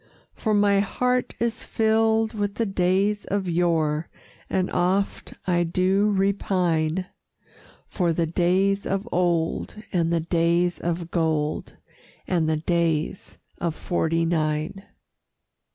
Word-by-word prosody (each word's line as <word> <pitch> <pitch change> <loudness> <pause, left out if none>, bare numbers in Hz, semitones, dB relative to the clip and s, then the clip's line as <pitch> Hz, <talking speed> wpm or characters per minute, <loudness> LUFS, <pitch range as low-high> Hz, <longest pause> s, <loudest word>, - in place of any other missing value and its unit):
For 215 -2 0
my 205 -1 +4
heart 250 +5 0
is 230 -1 -1
filled 220 0 +2
with 205 -2 -2
the 230 - 0
days 195 +2 +1
of 195 -1 -2
yore, 165 -2 +1 0.4
And 185 -1 0
oft 185 +3 0
I 175 -1 +2
do 185 +4 +2
repine 185 -4 +1 0.8
For 175 -3 0
the 165 +1 +1
Days 185 +4 +1
of 195 +3 -2
Old, 170 -2 0 0.2
and 170 -2 +1
the 170 -1 +1
Days 170 +1 +1
of 170 0 -3
Gold, 155 -3 -1 0.5
And 165 -3 +1
the 155 - +1
Days 165 +1 -1 0.2
of 170 -2 -1
'Forty 165 -1 0
nine. 155 +3 -1
180 Hz, 120 wpm, -24 LUFS, 165-200 Hz, 0.8 s, my